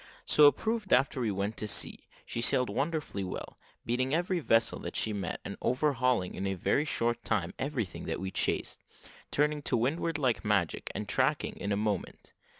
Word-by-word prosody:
So 150 -1 +7
it 145 - +6
proved 220 -3 -2
after 130 0 +3
we 115 - +1
went 100 +2 -2
to 105 - -3
sea; - - -3 0.2
she 115 - -3
sailed 125 +1 +2
wonderfully 145 -8 -2
well, 90 - -6 0.3
beating 130 +4 +1
every 175 +1 +1
vessel 115 -6 +2
that - - -6
she 110 - 0
met, 95 -5 -3
and - - -5
overhauling 125 -7 +1
in 95 +1 -3
a 95 - -1
very 140 - +1
short 120 -4 -1
time 90 -5 0
everything 130 -8 -3
that - - -2
we 95 0 -4
chased; - - -1 0.5
turning 150 +1 +1
to 140 - +1
windward 145 +6 0
like 130 -6 +1
magic, 100 -6 0
and 105 - -3
tacking 135 +3 +1
in 100 - -3
a 100 - +2
moment. 105 -2 -3
125 Hz, 185 wpm, -30 LUFS, 105-145 Hz, 0.5 s, So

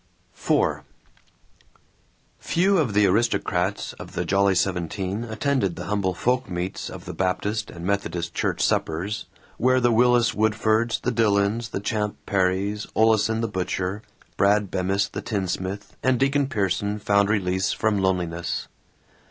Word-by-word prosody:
IV - - +1 1.6
Few 190 +2 +2
of 120 -10 0
the 105 0 +5
aristocrats 100 -2 0
of - - -9
the - - -2
Jolly 100 0 +3
Seventeen 95 +3 -1
attended 110 -4 -1
the - - -6
humble 100 -3 -1
folk 125 +3 0
meets 90 +1 -4
of - - -9
the - - -6
Baptist 105 +3 -1
and 85 0 -8
Methodist 90 -3 -2
church - - -1
suppers, 95 +6 -1 0.3
where 130 +2 +3
the 120 -1 +3
Willis 120 0 +4
Woodfords, 110 +1 +1
the 125 - 0
Dillons, 110 0 +1
the - - -3
Champ 105 0 -2
Perrys, 100 +2 0
Oleson 110 0 +3
the 115 - 0
butcher, 95 0 -2 0.4
Brad 100 0 +3
Bemis 95 +2 0
the - - -5
tinsmith, 100 -1 -3
and 130 -2 +2
Deacon 140 +1 +2
Pierson 100 -2 -1
found 100 -1 +2
release 95 -3 +1
from 110 -2 0
loneliness. 90 -3 -1
100 Hz, 135 wpm, -24 LUFS, 95-115 Hz, 1.6 s, the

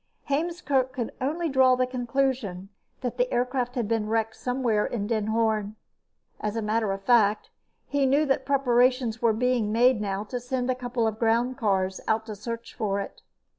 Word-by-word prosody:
Heemskerk 285 -4 0
could 240 -3 -3
only 320 +6 -1
draw 260 -3 +4
the 255 0 +1
conclusion 245 -6 -2 0.3
that 245 -1 -3
the 250 0 +1
aircraft 245 0 -1
had 240 -4 -1
been 220 -1 0
wrecked 225 0 0
somewhere 245 -4 0
in 210 -4 -2
Den 215 -1 -1
Hoorn. 220 -2 0 0.6
As 210 0 -3
a 225 - -1
matter 215 -1 0
of 195 0 -4
fact, 215 -2 +3 0.3
he 280 -1 +1
knew 285 +4 +3
that 270 -2 +1
preparations 250 -3 +2
were 230 -1 +4
being 235 -1 +1
made 240 0 +4
now 200 -1 -2
to 245 +4 -5
send 250 +1 -1
a - - +2
couple 245 -2 -2
of 220 0 -2
groundcars 225 -5 +1
out 220 0 +1
to 215 -2 -6
search 230 +3 -6
for 200 -3 -1
it. 200 - -7
240 Hz, 175 wpm, -26 LUFS, 215-255 Hz, 0.6 s, draw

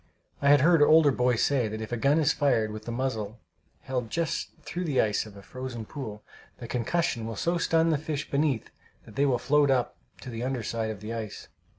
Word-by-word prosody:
I 140 - +3
had 145 -1 +7
heard 165 +1 +5
older 155 0 +6
boys 125 -2 +2
say 135 -5 +2
that 110 +1 -5
if 110 +1 -6
a - - 0
gun 140 +6 +3
is 150 -2 +3
fired 120 -7 +1
with 110 0 -8
the 120 - -4
muzzle 115 -4 -3 0.4
held 125 -4 -3
just 165 +4 -2
through 175 +5 -4
the 145 -5 0
ice 105 0 +1
of 100 -2 -13
a 100 - -12
frozen 130 -2 -6
pool, 110 -6 -7 0.3
the 120 - -8
concussion 120 -1 -1
will 115 - -5
so 170 - 0
stun 165 0 +3
the 150 - +1
fish 150 -1 -4
beneath 140 -5 0 0.3
that - - -14
they 140 +1 +3
will 130 -2 +2
float 145 +2 +3
up 130 -2 +1 0.3
to 130 - -7
the 115 0 -5
under 125 -1 -2
side 110 0 -2
of 105 -2 -6
the 110 +2 -5
ice. 110 -3 -6
130 Hz, 225 wpm, -27 LUFS, 110-145 Hz, 0.4 s, had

